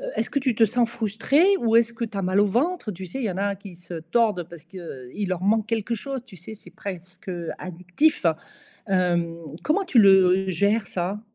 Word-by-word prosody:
est-ce - - -1
que 280 - +1
tu 255 -4 0
te 225 - +5
sens 235 +2 +1
frustré? 230 +6 +1 0.2
Ou 230 -1 +2
est-ce 235 0 +4
que 230 0 -3
tu 210 -2 -8
as - - 0
mal 185 +2 +2
au 205 - +4
ventre? 255 - 0
Tu 185 +1 -7
sais, 180 +10 -6
il 255 - -2
y 200 - 0
en 180 - -6
a 200 0 0
qui 195 -2 -12
se 175 0 -10
tordent 180 +2 0
parce 170 -3 -12
qu'il 170 -2 -7
leur 185 -1 -2
manque 215 +2 +2
quelque 230 +1 -1
chose, 265 +2 -5
tu 210 -7 -13
sais, 180 +6 -9
c'est - - -14
presque, 185 -1 -8
heu, 175 -2 -4
addictif. 180 - 0 0.6
Hem, 175 -3 +1 0.3
comment 375 +6 +1
tu 250 -9 +4
le 190 -1 +6
gères, 200 +4 +1
ça? 190 +4 -3
200 Hz, 215 wpm, -24 LUFS, 180-230 Hz, 0.6 s, le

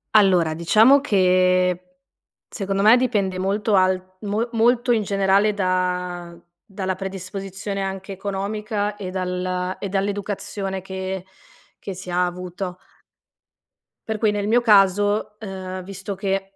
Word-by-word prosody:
Allora, 180 -6 +5
diciamo 220 - +5
che 185 -5 +2 0.7
secondo 195 0 -2
me 225 +4 +7
dipende 200 -7 0
molto 200 +3 0
al 185 0 +1
mo 210 +3 -1
molto 240 +2 +3
in 225 -2 +2
generale 200 +1 +2
da 180 -2 -2 0.3
dalla 190 -1 -3
predisposizione 195 +1 -5
anche 195 0 -4
economica 205 +2 -3
e 195 -3 -6
dal 180 0 -2
e 200 - -3
dall'educazione 195 0 -3
che 190 0 -5 0.5
che 195 - -6
si 185 0 -8
ha 180 +1 +2
avuto. 180 +1 -6 1.3
Per 220 -1 -2
cui 215 -1 +2
nel 205 -1 -2
mio 235 +3 +4
caso, 205 -1 +3
uhm, 185 -3 -6
visto 195 +1 -6
che, 195 0 -2
195 Hz, 125 wpm, -22 LUFS, 185-205 Hz, 1.3 s, me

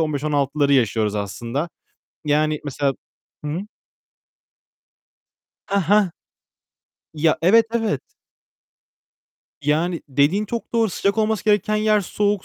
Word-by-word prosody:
15-16'ları 145 -2 0
yaşıyoruz 110 -5 +2
aslında. 115 - -3 0.6
Yani, 150 +1 +1
mesela 140 0 -1 0.5
Hı 150 - -3
hı. 165 +5 -2 2.1
Hah 200 0 +1
hah. 205 -3 +4 1.0
Ya, 155 +1 +2
evet, 225 +6 +5
evet. 220 - -1 1.5
Yani, 165 +4 0
dediğin 145 +10 +2
çok 235 +1 -5
doğru. 225 -2 +3
Sıcak 200 +5 0
olması 215 -1 0
gereken 210 0 +2
yer 215 0 +3
soğuk. 205 +1 -1
160 Hz, 100 wpm, -22 LUFS, 140-210 Hz, 2.1 s, evet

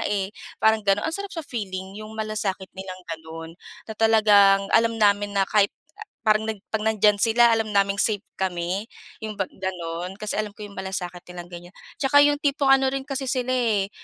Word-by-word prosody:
eh, 200 -1 -2 0.3
parang 220 0 +4
ganun. 200 +1 +2
Ang 320 - -1
sarap 400 0 -6
sa 330 -3 -5
feeling 190 -6 -5
yung 215 +1 -9
malasakit 210 -3 -3
nilang 190 -1 -8
ganun 160 0 -8 0.3
na 220 - -7
talagang 205 -3 +5
alam 230 0 +3
namin 205 -1 +2
na 195 - +4
kahit 200 0 +3 0.5
parang 215 0 +2
nag 215 -3 -4
'pag 220 0 -2
nandiyan 210 -1 +3
sila, 235 +2 +5
alam 225 -2 0
naming 200 0 +2
safe 210 -1 +1 0.2
kami 185 +2 -2 0.3
yun 215 -1 -6
bang 195 -2 -3
ganun, 180 -1 -4
kasi 210 +1 -4
alam 210 -1 -3
ko 210 - -11
yung 200 -2 -9
malasakit 185 -2 -4
nilang 175 -1 -9
ganiyan. 175 +1 -11 0.2
Tsaka 285 +1 +5
yung 290 0 +3
tipong 280 -1 +1
ano 270 0 +5
rin 270 - -2
kasi 270 -1 -4
sila, 255 -1 -1
eh, 220 -6 +1
210 Hz, 190 wpm, -24 LUFS, 190-225 Hz, 0.5 s, talagang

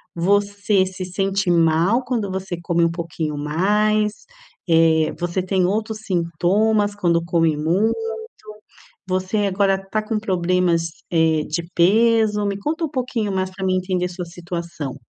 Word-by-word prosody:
você 200 +2 +2
se 185 0 -6
sente 195 +1 -1
mal 170 +8 +3
quando 225 -6 -2
você 190 -2 -4
come 170 0 +1
um 165 - +1
pouquinho 165 -3 -4
mais? 210 +7 +1 0.4
Eh, 160 -1 +4
você 175 +1 -1
tem 185 -1 +1
outros 215 +2 -1
sintomas 200 +4 +1
quando 170 -4 +1
come 165 -2 +2
muito? 175 +9 +1 1.1
Você 185 +3 -1
agora 195 0 +2
tá 215 - 0
com 215 0 -2
problemas, 180 -4 +1 0.2
eh, 160 -2 +3
de 170 +2 -3
peso? 215 +3 +3
Me 200 -1 -2
conta 315 +11 -3
um 310 - -5
pouquinho 245 -6 -2
mais 185 0 -1
para 190 +1 -7
mim 185 0 +2
entender 185 -1 -1
sua 180 0 -6
situação. 170 -4 -6
185 Hz, 145 wpm, -21 LUFS, 170-205 Hz, 1.1 s, Eh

